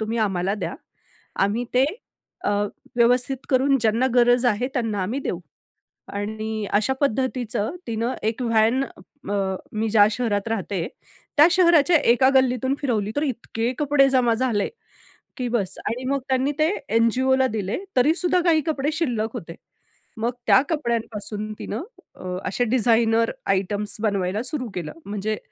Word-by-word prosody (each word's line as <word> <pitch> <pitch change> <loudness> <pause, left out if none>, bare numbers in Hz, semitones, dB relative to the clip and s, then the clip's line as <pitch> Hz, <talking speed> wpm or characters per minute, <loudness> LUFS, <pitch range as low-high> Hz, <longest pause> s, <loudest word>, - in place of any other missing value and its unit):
तुम्ही 220 +2 -2
आम्हाला 195 -2 0
द्या, 210 - -4 0.6
आम्ही 210 +5 +1
ते 255 +2 +5 0.6
अ, - - +1 0.5
व्यवस्थित 245 +3 +3
करून 270 +1 +3
ज्यांना 230 +3 +2
गरज 245 0 +4
आहे 235 +2 +1
त्यांना 220 -6 -1
आम्ही 230 +9 -2
देऊ. - - -3 0.7
आणि 215 +1 -4
अशा 215 +5 +2
पद्धतीचं 255 -1 -1
तिनं 230 +2 -2
एक 220 +3 -1
व्हॅन 230 +2 +3
अ, 270 -9 -9 0.4
मी 220 +1 -1
ज्या 205 -1 +6
शहरात 220 -2 -1
राहते, 195 -5 -2 0.5
त्या 300 +1 +8
शहराच्या 345 -2 +5 0.2
एका 260 +2 +4
गल्लीतून 260 0 +2
फिरवली, 215 -7 -1
तर 290 - +1
इतके 240 -3 -2
कपडे 285 -2 +4
जमा 245 -3 +3
झाले 230 -4 0 0.7
की 250 - -2
बस. 210 -6 -1
आणि 235 +4 -2
मग 275 0 +1
त्यांनी 265 +2 +2
ते 310 - +4 0.2
एन-जी-ओला 260 +4 +3
दिले, 200 -2 -2 0.2
तरी 290 +6 +5
सुद्धा 360 +1 +1
काही 320 -2 +4
कपडे 295 -1 0
शिल्लक 245 -9 -1
होते. 165 0 -7 0.6
मग 230 +2 0 0.2
त्या - - +7
कपड्यांपासून 225 -7 -2
तिनं 225 - -4 0.3
अ, - - -12 0.2
असे 200 +6 0
डिझाइनर 230 -1 +3 0.2
आयटम्स 200 +2 -1
बनवायला 200 0 0
सुरू 255 -2 -4
केलं. 170 -4 -4
म्हणजे 210 +1 -3
230 Hz, 145 wpm, -23 LUFS, 215-260 Hz, 0.7 s, त्या